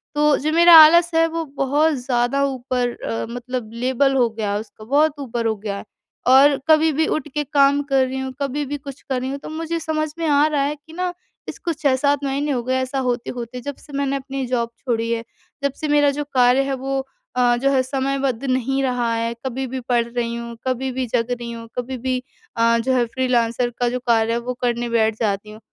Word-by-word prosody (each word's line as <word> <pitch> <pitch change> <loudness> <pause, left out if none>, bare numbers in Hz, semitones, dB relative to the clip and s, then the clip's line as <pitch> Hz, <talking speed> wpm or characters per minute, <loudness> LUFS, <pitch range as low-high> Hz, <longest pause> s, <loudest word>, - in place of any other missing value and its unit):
तो 295 -1 +4
जो 305 +2 -1
मेरा 340 +1 +7
आलस 340 +2 +8
है, 330 0 +5
वो 330 0 -3
बहुत 295 +4 +2
ज़्यादा 245 +2 +1
ऊपर 255 -2 -1
अ, 115 0 -2
मतलब 245 -1 -5
लेबल 260 +3 +1
हो 245 -3 +3
गया 220 -2 -3
है 205 - 0
उसको 215 0 -11
बहुत 290 +3 +2
ऊपर 240 -4 -3
हो 220 - 0
गया 200 -1 -4
है, 200 - -9 0.4
और 275 +2 +6
कभी 315 0 +5
भी 315 +2 +1
उठ 310 - -6
के 295 - +1
काम 280 -1 +3
कर 270 -2 +2
रही 265 +1 -4
हूँ, 265 0 -4
कभी 280 +1 -1
भी 290 +2 -4
कुछ 275 -1 -10
कर 260 -2 -2
रही 260 - -3
हूँ 280 - -3
तो - - -9
मुझे 330 +1 -3
समझ 310 -1 -2
में 330 - -1
आ 290 0 +4
रहा 295 -2 0
है 290 +2 -1
कि 305 +2 -17
ना, 360 0 -2 0.3
इसको 335 - -4
6-7 285 -1 +1
महीने 280 +2 -1
हो 250 -3 0
गए 255 +2 -1
ऐसा 265 +1 -2
होते-होते 245 0 -4
जब 285 +2 -5
से 290 - -16
मैंने 275 -1 0
अपनी 270 0 -4
जॉब 235 -2 -1
छोड़ी 230 -2 -1
है, 230 0 -1 0.4
जब 280 - +1
से 305 - -1
मेरा 290 -1 +4
जो 295 +1 -3
कार्य 250 +2 +5
है 275 0 -2
वो 270 +1 -2 0.3
अ, 245 -1 +3
जो 275 +3 +1
है 265 -1 +3
समयबद्ध 270 -1 -1
नहीं 265 +1 0
रहा 245 -3 0
है। 230 +1 -1
कभी 265 +1 -2
भी 260 +1 -4
पढ़ 240 -1 +3
रही 235 0 -3
हूँ, 235 0 -6
कभी 260 +1 -1
भी 255 0 -2
जग 245 0 +1
रही 240 -1 -4
हूँ, 230 -1 -8
कभी 250 +1 -3
भी 255 +1 -1 0.4
अ, 230 0 +4
जो 260 +3 0
है 245 -2 +2
फ्रीलांसर 245 -2 +1
का 245 - +2
जो 250 +1 -2
कार्य 225 -1 +3
है, 235 - +1
वो 250 +1 -4
करने 240 -1 -1
बैठ 220 -2 +2
जाती 210 -1 -1
हूँ। 215 - -12
260 Hz, 230 wpm, -21 LUFS, 240-285 Hz, 0.4 s, आलस